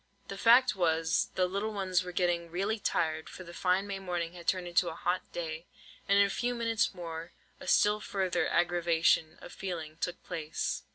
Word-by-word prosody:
The 195 - -5
fact 245 +1 +6
was, 165 -2 +1
the 185 - +3
little 200 +4 -2
ones 185 -3 0
were 180 - -6
getting 175 -1 0
really 200 +6 -1
tired, 160 -5 -1
for 185 - -9
the 170 -1 -11
fine 185 +2 +1
May 200 -1 -4
morning 175 -3 -3
had 170 -2 -11
turned 185 -2 +1
into 175 0 +2
a 160 - -7
hot 180 +2 -2
day; 160 -1 -5 0.4
and 200 - +5
in 200 - +6
a - - -2
few 245 +3 -1
minutes 230 -4 0
more, 165 -1 -7 0.3
a - - -10
still 210 0 +4
further 190 -3 -1
aggravation 170 -2 +2
of - - -10
feeling 160 -5 -5
took 175 +1 -4
place. 155 -1 -3
180 Hz, 190 wpm, -31 LUFS, 170-195 Hz, 0.4 s, fact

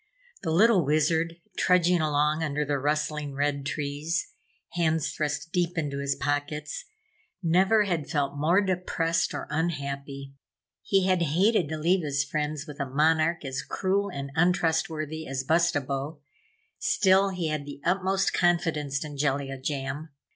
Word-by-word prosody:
The 165 - -3
little 190 +3 +5
Wizard, 160 +3 +1 0.2
trudging 180 -1 +3
along 150 +1 +1
under 150 -1 -1
the 145 -1 -1
rustling 150 0 -1
red 140 0 -1
trees, 150 +5 -2 0.4
hands 160 -3 0
thrust 150 +1 -3
deep 175 -1 0
into 145 -3 -2
his 140 0 0
pockets, 145 - -3 0.6
never 190 +6 +4
had 170 -7 -2
felt 145 -1 -1
more 165 +7 +3
depressed 175 -3 0
or - - -4
unhappy. 140 -3 -3 0.5
He 195 -2 +2
had 185 -2 +2
hated 175 +2 +2
to 160 - -3
leave 175 +3 +2
his 145 -1 0
friends 150 +1 -3
with 150 -3 -10
a 140 -2 -2
Monarch 160 +3 +2
as 130 -1 -3
cruel 200 +1 -1
and 140 -5 -6
untrustworthy 160 -2 0
as 135 0 -2
Bustabo. 145 -2 0 0.6
Still, 195 0 +3
he 180 -4 -2
had 150 -2 -3
the 145 - -8
utmost 190 +1 +1
confidence 155 -5 +1
in 145 -1 -8
Jellia 135 -1 -1
Jam. 145 +2 -3
155 Hz, 140 wpm, -27 LUFS, 145-175 Hz, 0.6 s, little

